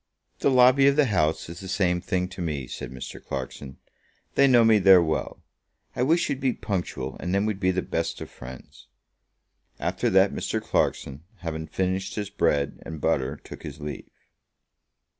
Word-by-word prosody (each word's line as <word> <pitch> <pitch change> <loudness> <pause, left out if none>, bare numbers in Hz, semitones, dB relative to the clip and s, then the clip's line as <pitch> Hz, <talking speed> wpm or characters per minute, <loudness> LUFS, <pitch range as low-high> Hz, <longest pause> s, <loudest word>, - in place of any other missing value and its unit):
"The - - +3
lobby 130 +1 +6
of 140 - +4
the 150 -1 +4
House 80 -9 0
is 85 +1 -8
the 95 - -8
same 90 -2 +1
thing 90 0 -1
to 95 -1 -8
me," 75 -6 -2
said 65 - -7
Mr. 65 -1 -8
Clarkson. 65 0 -6 0.6
"They 140 - +5
know 120 -3 +6
me 110 -1 +5
there 95 -1 +8
well. 80 -2 -2 0.5
I - - -2
wish 160 +7 +3
you'd 135 - -2
be 130 -2 +1
punctual, 85 - -4
and 90 +2 -2
then 100 +1 +2
we'd 105 -3 -2
be 95 -1 +2
the 95 0 0
best - - -2
of - - -6
friends." 65 0 -12 0.9
After - - 0
that - - +4
Mr. - - -2
Clarkson, 70 +4 -1 0.2
having 80 -2 -4
finished 95 +3 -2
his 105 -2 -4
bread 70 -1 0
and 80 -1 -7
butter, 75 -4 0
took - - -10
his - - -8
leave. 75 -1 -7
90 Hz, 180 wpm, -25 LUFS, 75-105 Hz, 0.9 s, there